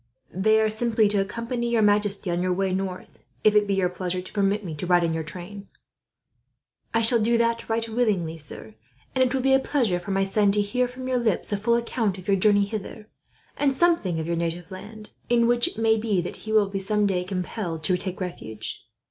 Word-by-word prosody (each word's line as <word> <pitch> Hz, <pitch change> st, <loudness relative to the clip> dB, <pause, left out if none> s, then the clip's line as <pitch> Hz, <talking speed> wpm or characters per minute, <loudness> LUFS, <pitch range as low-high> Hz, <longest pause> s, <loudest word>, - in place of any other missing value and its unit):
"They 215 Hz, +4 st, +3 dB
are 220 Hz, -, +3 dB
simply 220 Hz, 0 st, +2 dB
to 205 Hz, -1 st, +1 dB
accompany 235 Hz, +4 st, -3 dB
your 230 Hz, -2 st, +2 dB
majesty 205 Hz, -2 st, +2 dB
on 175 Hz, +1 st, 0 dB
your 185 Hz, 0 st, +1 dB
way 190 Hz, 0 st, 0 dB
north, 185 Hz, -1 st, -5 dB, 0.2 s
if 215 Hz, -, +5 dB
it 210 Hz, -1 st, +3 dB
be 200 Hz, -, +1 dB
your 190 Hz, -2 st, +2 dB
pleasure 180 Hz, 0 st, -3 dB
to 180 Hz, -, -9 dB
permit 200 Hz, 0 st, 0 dB
me 165 Hz, -, -5 dB
to 155 Hz, +4 st, -5 dB
ride 175 Hz, -1 st, +4 dB
in 165 Hz, -1 st, 0 dB
your 160 Hz, -, -2 dB
train." 185 Hz, +6 st, -9 dB, 1.2 s
"I 230 Hz, 0 st, +1 dB
shall 230 Hz, +1 st, +4 dB
do 230 Hz, +2 st, +2 dB
that 230 Hz, 0 st, 0 dB
right 225 Hz, 0 st, 0 dB
willingly, 210 Hz, -8 st, 0 dB
sir; 145 Hz, -8 st, -8 dB, 0.4 s
and 260 Hz, -, +3 dB
it 255 Hz, -, +1 dB
will 265 Hz, -1 st, -1 dB
be 270 Hz, 0 st, +4 dB
a 265 Hz, -, +6 dB
pleasure 240 Hz, -10 st, 0 dB
for 180 Hz, -, -10 dB
my 195 Hz, 0 st, +1 dB
son 200 Hz, +1 st, +2 dB
to 210 Hz, -, +3 dB
hear, 250 Hz, +5 st, 0 dB
from 255 Hz, +1 st, -8 dB
your 255 Hz, -1 st, +1 dB
lips, 220 Hz, -4 st, 0 dB
a -, -, +1 dB
full 235 Hz, +4 st, +2 dB
account 230 Hz, -4 st, -1 dB
of 185 Hz, -, -11 dB
your 200 Hz, -, +4 dB
journey 205 Hz, +1 st, +4 dB
hither, 210 Hz, +1 st, -7 dB, 0.5 s
and 275 Hz, -2 st, +1 dB
something 265 Hz, -, +2 dB
of 160 Hz, -, -3 dB
your 170 Hz, +1 st, -1 dB
native 170 Hz, +1 st, -3 dB
land, 210 Hz, +3 st, -10 dB, 0.2 s
in 235 Hz, -1 st, +4 dB
which 240 Hz, 0 st, +4 dB
it -, -, -7 dB
may 225 Hz, 0 st, +3 dB
be 215 Hz, -3 st, 0 dB
that 175 Hz, -, -4 dB
he -, -, -2 dB
will 215 Hz, -2 st, +4 dB
be, 195 Hz, 0 st, -3 dB
some 210 Hz, +2 st, +1 dB
day, 185 Hz, -3 st, 0 dB
compelled 180 Hz, -2 st, -4 dB
to 180 Hz, +4 st, +2 dB
take 185 Hz, 0 st, -5 dB
refuge." 110 Hz, -, -6 dB
205 Hz, 230 wpm, -25 LUFS, 185-230 Hz, 1.2 s, a